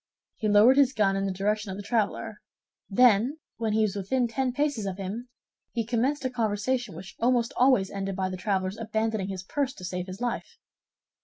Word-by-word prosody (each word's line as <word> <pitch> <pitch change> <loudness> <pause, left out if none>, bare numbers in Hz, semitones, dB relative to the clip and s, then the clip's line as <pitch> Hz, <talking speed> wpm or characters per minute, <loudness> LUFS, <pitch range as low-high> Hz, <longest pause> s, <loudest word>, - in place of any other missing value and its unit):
He 220 - -1
lowered 215 +6 +6
his 275 -2 +5
gun 200 -4 +2
in 195 0 0
the - - -1
direction 210 +2 -1
of 190 - -5
the 205 - -6
traveler; 215 -1 -1 0.5
then, 240 +5 +4 0.2
when 225 -2 -1
he 220 0 +3
was 205 -2 0
within 240 +6 0
ten 255 +2 -1
paces 270 -6 -1
of 190 -1 -4
him, 205 +6 -5 0.4
he 230 -2 -1
commenced 255 +5 0
a - - +2
conversation 235 -1 -1
which 185 +2 -10
almost 240 -1 +2
always 250 -7 +4
ended 195 -1 -3
by 190 -1 -1
the 185 - -4
traveler's 190 +1 -1
abandoning 220 -2 -1
his 190 -2 -5
purse 270 +6 -2
to 180 - -8
save 180 +1 -4
his 185 +2 -7
life. 245 0 -3
215 Hz, 200 wpm, -27 LUFS, 195-245 Hz, 0.5 s, lowered